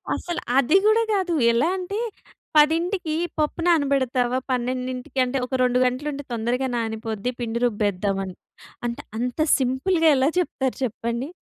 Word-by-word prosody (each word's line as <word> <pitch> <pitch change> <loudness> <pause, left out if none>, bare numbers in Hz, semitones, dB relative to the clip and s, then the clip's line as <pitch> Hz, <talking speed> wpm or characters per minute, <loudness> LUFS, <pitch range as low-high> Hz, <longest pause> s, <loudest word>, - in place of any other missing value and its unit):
అసలు 345 -1 -4 0.2
అది 275 +8 +5
కూడా 445 +1 +4
కాదు. 370 -3 0 0.2
ఎలా 235 +8 +2
అంటే 395 +4 -4 0.6
"పదింటికి 325 +2 +2 0.2
పప్పు 305 +3 0
నానబెడతావా? 265 -6 +2
పన్నెండింటికి 255 +1 -2
అంటే 250 +2 -2
ఒక 260 - -3
2 250 0 +2
గంటలుంటే 285 +3 -2
తొందరగా 240 +3 -1
నానిపోద్ది 225 +1 -3
పిండి 235 0 -2
రుబ్బేద్దామని." 200 -4 -1 0.5
అంటే 235 - -4 0.2
అంత 245 +4 -3 0.2
సింపుల్‌గా 320 +7 +1
ఎలా 265 +2 +3
చెప్తారు 265 -7 -2
చెప్పండి. 235 +2 -3
255 Hz, 125 wpm, -23 LUFS, 235-305 Hz, 0.6 s, అది